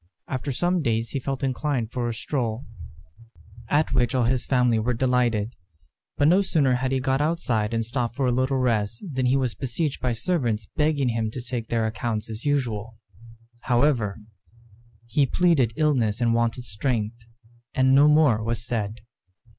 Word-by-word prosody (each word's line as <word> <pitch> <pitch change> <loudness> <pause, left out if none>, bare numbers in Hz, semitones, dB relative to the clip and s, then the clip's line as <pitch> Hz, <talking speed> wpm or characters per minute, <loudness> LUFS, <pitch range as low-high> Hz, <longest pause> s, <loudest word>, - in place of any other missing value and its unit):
After 135 +1 -3
some 175 +6 +1
days 115 -4 -1
he 140 - -2
felt 135 +1 -4
inclined 130 -3 -1
for 125 -2 -2
a - - -2
stroll, 120 -1 -3 1.0
at 150 -1 +2
which 125 -1 +2
all 125 - +2
his 125 +1 0
family 125 -3 +3
were 120 +2 0
delighted; 120 -3 +1 0.6
but 145 - +4
no 180 +5 +5
sooner 155 -9 +2
had 130 +1 -1
he 135 - +1
got 135 +1 0
outside 125 -9 0
and 115 -1 -1
stopped 120 0 -2
for 140 - 0
a 125 - +2
little 130 +2 +1
rest 115 -4 0
than 130 -5 -1
he 130 +2 +3
was 130 -4 0
besieged 135 +3 -2
by 125 -2 0
servants 115 - -1
begging 150 -4 +1
him 115 -1 -1
to 120 - -6
take 120 -2 -4
their 115 -1 0
accounts 110 0 -3
as 110 +4 -5
usual. 115 -6 -1 0.6
However, 120 -5 +1 0.9
he 135 +4 +1
pleaded 155 -8 +3
illness 130 -9 +1
and 115 -1 +2
want 115 0 +1
of 125 - -8
strength, 115 0 -3 0.5
and 130 0 +4
no 140 +2 +6
more 150 -8 +4
was 115 +1 -2
said. 110 -1 -3
125 Hz, 170 wpm, -24 LUFS, 115-135 Hz, 1.0 s, no